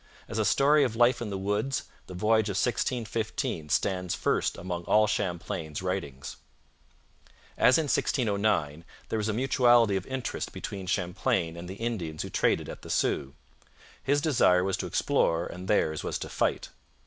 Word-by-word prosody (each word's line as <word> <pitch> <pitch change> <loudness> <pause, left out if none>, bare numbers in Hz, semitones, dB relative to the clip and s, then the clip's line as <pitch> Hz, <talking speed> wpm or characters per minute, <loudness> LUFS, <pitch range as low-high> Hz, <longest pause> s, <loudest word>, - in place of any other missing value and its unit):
As 110 - -4
a 110 - +2
story 145 +7 +4
of 120 -4 -1
life 120 +1 +3
in 115 - -3
the 100 - -3
woods, 105 +7 -1 0.2
the 90 - -8
Voyage 110 +2 +2
of 95 - -2
1615 115 - -1
stands 90 -1 0
first - - 0
among 90 -1 -4
all 110 0 +4
Champlain's 85 -6 -3
writings. 90 -8 -4 1.2
As 125 - +5
in 160 - +1
1609, 100 - 0 0.3
there 110 - -1
was 105 0 -1
a - - 0
mutuality 120 -3 +4
of 95 -1 -3
interest 130 -2 -4
between 95 -2 -6
Champlain 90 -2 0
and 85 +1 -8
the 95 - -6
Indians 100 -9 -3
who - - -7
traded - - +1
at - - -8
the - - -11
Sault. 70 -1 0 0.7
His 145 +2 +1
desire 105 - +4
was 95 0 0
to - - -4
explore 85 +1 +1
and 90 +1 -8
theirs 80 -7 +1
was - - -2
to - - -6
fight. - - -1
100 Hz, 165 wpm, -28 LUFS, 90-120 Hz, 1.2 s, As